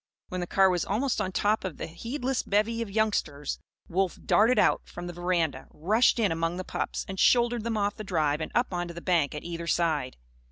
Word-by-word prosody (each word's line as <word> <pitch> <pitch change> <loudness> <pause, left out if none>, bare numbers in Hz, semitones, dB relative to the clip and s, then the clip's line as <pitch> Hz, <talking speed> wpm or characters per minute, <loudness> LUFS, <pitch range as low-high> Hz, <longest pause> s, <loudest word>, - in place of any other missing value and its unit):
When 185 0 -3
the 175 - -3
car 190 0 +4
was 175 -1 0
almost 235 +6 0
on 185 - -2
top 210 +3 +1
of 185 -7 -5
the - - -4
heedless 245 - -3
bevy 215 +3 0
of 230 - -3
youngsters, 195 -9 -1 0.3
Wolf 185 +1 0
darted 230 +4 +4
out, - - +4
from 175 - -7
the 175 - -6
veranda, 175 -3 -1
rushed 215 +12 +2
in 215 -6 +2
among 165 +1 -1
the 185 - -3
pups - - -3
and 190 -1 -6
shouldered 240 -2 +4
them 230 -1 -1
off 205 -1 0
the 215 - -5
drive 155 -6 0
and - - -4
up 240 -5 +1
onto 175 -1 -3
the - - -5
bank 170 -5 +1
at 150 - -6
either 170 -1 -5
side. 160 -7 0
185 Hz, 215 wpm, -28 LUFS, 170-220 Hz, 0.3 s, car